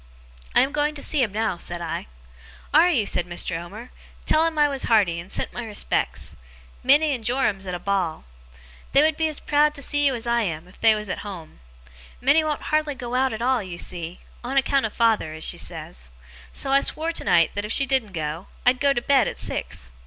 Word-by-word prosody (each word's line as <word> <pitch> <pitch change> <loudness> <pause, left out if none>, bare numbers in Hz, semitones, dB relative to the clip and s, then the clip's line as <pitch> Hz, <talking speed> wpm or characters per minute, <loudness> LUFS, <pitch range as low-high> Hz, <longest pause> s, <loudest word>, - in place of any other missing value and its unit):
'I - - +7
am 270 - +1
going 300 0 0
to 285 - -5
see 300 - +1
him 230 -5 +1
now,' 215 -3 -1
said 175 0 -4
I. 165 - -4 0.7
'Are 325 +4 +6
you?' 250 -12 +2
said 175 -3 0
Mr. 175 0 -3
Omer. 200 +9 -8 0.3
'Tell 320 +1 +4
him 325 -1 -4
I 295 -1 +5
was 275 -2 -2
hearty, 195 -7 +3
and 175 +3 -9
sent - - -2
my 240 - -5
respects. 215 -2 -2 0.5
Minnie 290 +3 +4
and 245 -4 -5
Joram's 220 -5 0
at 180 - -3
a - - -5
ball. 185 -4 -1 0.7
They 280 - +6
would 315 0 +3
be 320 0 +1
as 305 -2 -3
proud 295 0 +2
to 280 - -4
see 290 +1 +2
you 270 - +1
as 230 - -5
I 235 0 +2
am, 165 -5 -3
if 185 - -19
they 225 -1 +6
was 210 0 -4
at 185 - -3
home. 180 - -9 0.6
Minnie 285 +5 +4
won't 305 -1 -2
hardly 305 -2 +1
go 245 -2 -6
out 260 +1 +2
at 220 +1 -4
all, 255 -1 +2
you 185 -3 -7
see, 170 0 -5 0.2
"on 260 +3 -2
account 275 -2 +2
of 215 - -13
father", 225 -9 +2
as 160 - -6
she - - +2
says. - - -7 0.4
So 270 - -1
I 275 0 +5
swore 320 +3 0
tonight, 170 - +2
that 205 - -3
if 210 - -5
she 275 - +4
didn't 260 -7 0
go, 155 +1 -4 0.2
I'd 250 +1 +4
go 280 -1 +3
to 240 - -2
bed 270 -4 +4
at - - -4
six. - - -5
235 Hz, 225 wpm, -24 LUFS, 185-280 Hz, 0.7 s, I